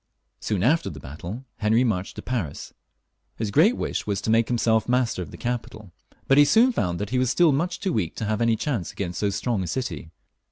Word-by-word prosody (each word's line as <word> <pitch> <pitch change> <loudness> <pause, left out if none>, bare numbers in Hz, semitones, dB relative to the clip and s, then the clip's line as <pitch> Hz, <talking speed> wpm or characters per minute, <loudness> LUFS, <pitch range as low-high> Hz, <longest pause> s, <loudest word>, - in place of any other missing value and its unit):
Soon 100 -4 -1
after 145 -3 +2
this 75 -4 -9
battle 85 - -8
Henry 110 +3 +3
marched 100 -6 -1
to - - -8
Paris. 110 - -4 0.6
His 110 -2 -3
great 195 - +4
wish - - -3
was 100 -2 0
to 110 - -1
make 115 0 +3
himself 115 -2 +1
master 125 -6 +1
of 85 - -6
the - - -10
capital, 110 -5 -5 0.4
but 135 +1 +5
he - - +9
soon 230 - +5
found 90 - -1
that 105 +3 -4
he 130 - +1
was 130 -1 +2
still 170 +4 +4
much 160 +6 -1
too 190 -4 -1
weak 90 -7 -1
to 110 - -3
have 110 +1 -1
any 115 -1 +3
chance 115 - -2
against 90 -3 -4
so 100 - +1
strong 100 +2 -1
a 90 - -3
city. 85 - -4
110 Hz, 225 wpm, -24 LUFS, 100-130 Hz, 0.6 s, he